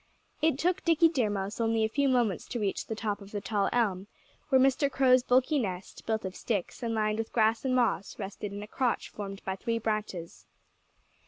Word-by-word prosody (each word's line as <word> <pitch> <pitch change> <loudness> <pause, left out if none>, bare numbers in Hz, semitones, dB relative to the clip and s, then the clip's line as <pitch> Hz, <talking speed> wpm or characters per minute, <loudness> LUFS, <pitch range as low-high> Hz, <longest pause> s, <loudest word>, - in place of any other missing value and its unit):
It 315 -4 +3
took 360 +5 0
Dickie 330 0 +5
Deer 255 -9 +1
Mouse 200 +2 -3
only 225 -1 +2
a - - +3
few 280 +5 +1
moments 240 -7 +1
to 240 - -4
reach 200 -3 -2
the 220 - -3
top 210 -1 -3
of 200 - -11
the 205 - -3
tall 200 -1 0
elm, 200 -5 0 0.4
where 265 -2 +5
Mr. 270 +2 +3
Crow's 260 -1 +5
bulky 255 +4 +3
nest, 190 -5 -5
built 220 -2 -1
of 190 0 -5
sticks 205 -2 -3
and 230 -2 -1
lined 215 0 0
with 225 - -3
grass 225 -1 +2
and 255 -1 +2
moss, 235 -6 0
rested 200 0 -5
in 205 +1 -6
a - - -9
crotch 245 +2 -1
formed 195 -1 -7
by 190 - -2
three 230 +4 -2
branches. 215 -6 -4
220 Hz, 210 wpm, -29 LUFS, 205-255 Hz, 0.4 s, Dickie